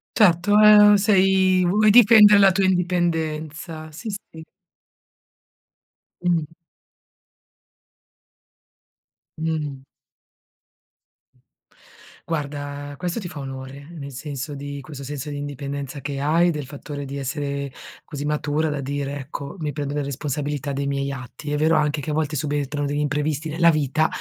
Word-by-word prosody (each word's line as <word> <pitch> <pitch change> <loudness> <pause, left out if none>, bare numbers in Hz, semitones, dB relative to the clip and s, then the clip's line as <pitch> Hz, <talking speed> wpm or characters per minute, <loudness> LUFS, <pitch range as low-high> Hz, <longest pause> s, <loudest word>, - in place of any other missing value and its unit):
Certo, 205 0 +4
ehm, 210 -1 +8
sei 190 -2 +3
vuoi 210 +4 +4
difendere 210 -2 +8
la 195 -1 +6
tua 190 +1 +1
indipendenza, 165 -3 -1
sì, 220 +9 -7
sì. 195 -5 -8 1.8
Mh-mh. 165 -3 0 2.8
Mh. 155 -4 -3 2.5
Guarda, 145 -2 -4
questo 180 +4 -3
ti 190 - -6
fa 155 -3 -8
onore, 135 +1 -8
nel 140 -4 -8
senso 145 +2 -6
di 140 0 -6
questo 140 0 -9
senso 145 +1 -6
di 145 - -5
indipendenza 140 -1 -5
che 140 0 -4
hai, 165 +4 +3
del 150 -3 -4
fattore 145 +1 -7
di 140 0 -6
essere 140 0 -4 0.3
così 145 -2 -6
matura 150 +1 0
da 145 -1 -3
dire: 140 +1 -3
"Ecco, 140 +1 -7
mi 150 -2 -2
prendo 145 -1 -4
le 145 - -1
responsabilità 145 +1 -3
dei 140 +1 -2
miei 140 0 -1
atti". 135 +3 -7
È 150 - 0
vero 160 +2 +3
anche 150 0 +1
che 150 +2 -4
a - - -2
volte 155 0 -1
subentrano 145 0 -2
degli 145 +1 -2
imprevisti 150 +1 -1
nella 170 +2 +4
vita 155 +1 +1
150 Hz, 130 wpm, -23 LUFS, 140-170 Hz, 2.8 s, ehm